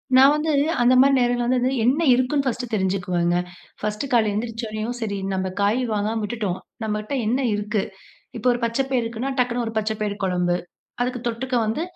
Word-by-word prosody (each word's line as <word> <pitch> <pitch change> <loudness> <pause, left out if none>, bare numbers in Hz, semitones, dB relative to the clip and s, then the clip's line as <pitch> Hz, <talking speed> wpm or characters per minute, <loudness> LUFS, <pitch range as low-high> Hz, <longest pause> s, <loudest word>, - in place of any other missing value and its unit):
நான் 270 +2 +8
வந்து 305 +1 0 0.3
அந்த 245 +1 +5
மாரி 275 +1 +6
நேரங்கள்ல 245 -1 +1
வந்து 255 +1 +2
வந்து 255 +2 +1
என்ன 275 +7 +3
இருக்குன்னு, 265 +2 +1
ஃபர்ஸ்ட்டு 250 -1 -2
தெரிஞ்சுக்குவேங்க. 180 -3 +1 0.4
ஃபர்ஸ்ட்டு 210 +6 -3
காலைல 225 -3 +4
எழுந்திரிச்சோனயும் 225 +1 -3
சரி, 200 -2 -2 0.2
நம்ப 190 0 -1
காய் 215 +6 +2
வாங்காம 215 +2 -1
விட்டுட்டோம், 205 -4 -2 0.2
நம்மட்ட 215 +2 -3
என்ன 245 +5 +1 0.2
இருக்கு? 210 0 -1 0.6
இப்ப 230 +3 -5
ஒரு 240 - -1
பச்சப்பயிறு 255 +1 0
இருக்குனா, 235 +4 -3
டக்குனு 245 -1 +1
ஒரு 225 - -4
பச்சபயிறு 215 -1 -2
குழம்பு 180 -1 +1 0.5
அதுக்கு 250 -1 -2
தொட்டுக்க 250 +2 -2
வந்து 225 +9 -1
230 Hz, 165 wpm, -23 LUFS, 210-250 Hz, 0.6 s, நான்